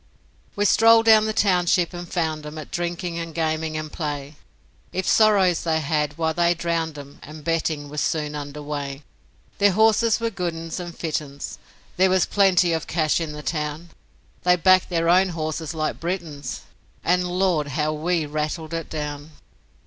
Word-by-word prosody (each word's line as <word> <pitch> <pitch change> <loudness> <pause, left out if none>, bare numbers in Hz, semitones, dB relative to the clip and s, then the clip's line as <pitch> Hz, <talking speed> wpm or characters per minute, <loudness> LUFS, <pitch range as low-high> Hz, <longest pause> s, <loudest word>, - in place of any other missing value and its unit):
We 205 - +1
strolled 225 +2 +6
down 220 -1 +6
the - - 0
township 180 -4 +2
and 175 -1 -8
found 160 -3 -1
'em 150 +1 -8
At 155 - -8
drinking 175 0 -3
and 165 -1 -6
gaming 155 -1 -1
and 155 -1 -5
play; 145 -2 -4 0.6
If 185 0 -3
sorrows 200 -5 +4
they 160 -1 +1
had, 150 0 -1
why 160 -1 0
they 175 +1 +2
drowned 165 -2 -2
'em, 140 0 -11
And 150 +1 -11
betting 160 -2 -1
was 150 +1 -4
soon 150 -2 -1
under 145 0 -6
way. 145 -1 -5 0.6
Their 200 -1 +4
horses 220 +2 +3
were 230 0 -1
good 180 -4 -3
'uns 165 +1 -5
and 175 -1 -7
fit 160 -2 -1
'uns, 140 -1 -8 0.4
There 190 +1 +4
was 185 -1 +3
plenty 185 -4 +3
of 160 0 -2
cash 155 0 +1
in 155 -2 -4
the 150 0 -8
town; 150 +2 -3 0.5
They 180 0 +4
backed 185 +1 +4
their 165 -2 0
own 185 +2 +5
horses 155 0 -3
like 155 -1 -2
Britons, 165 -6 -4 0.4
And, 180 +1 +2
Lord! 180 -4 +1
how 150 +2 -1
WE 160 +1 0
rattled 155 +2 -3
it 165 -1 -4
down! 150 -1 -5
165 Hz, 175 wpm, -23 LUFS, 150-180 Hz, 0.6 s, strolled